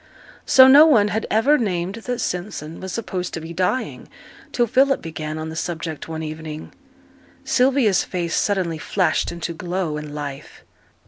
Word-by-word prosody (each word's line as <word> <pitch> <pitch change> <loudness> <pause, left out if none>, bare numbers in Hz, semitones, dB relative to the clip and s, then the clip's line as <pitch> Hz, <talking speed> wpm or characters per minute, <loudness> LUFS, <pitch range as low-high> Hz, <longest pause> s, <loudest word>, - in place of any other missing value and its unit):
So 260 0 +8
no 290 +4 +8
one 215 -9 +4
had 220 +2 -2
ever 275 +8 +3
named 185 -4 -2
that 245 -1 -2
Simpson 175 -3 -4
was 190 0 -6
supposed 185 -5 -4
to - - -4
be 165 +1 -8
dying 185 +9 -2 0.4
till 240 - +2
Philip 270 +4 +3
began 155 -1 -6
on 155 0 -5
the 160 - -7
subject 165 -2 -4
one 160 0 -5
evening. 155 0 -7 0.7
Sylvia's 250 -6 +3
face 170 -3 -3
suddenly 180 -6 0
flashed 185 +3 0
into 170 0 -5
glow 175 -2 -3
and 150 -1 -7
life. 145 -2 -7
180 Hz, 155 wpm, -21 LUFS, 160-220 Hz, 0.7 s, So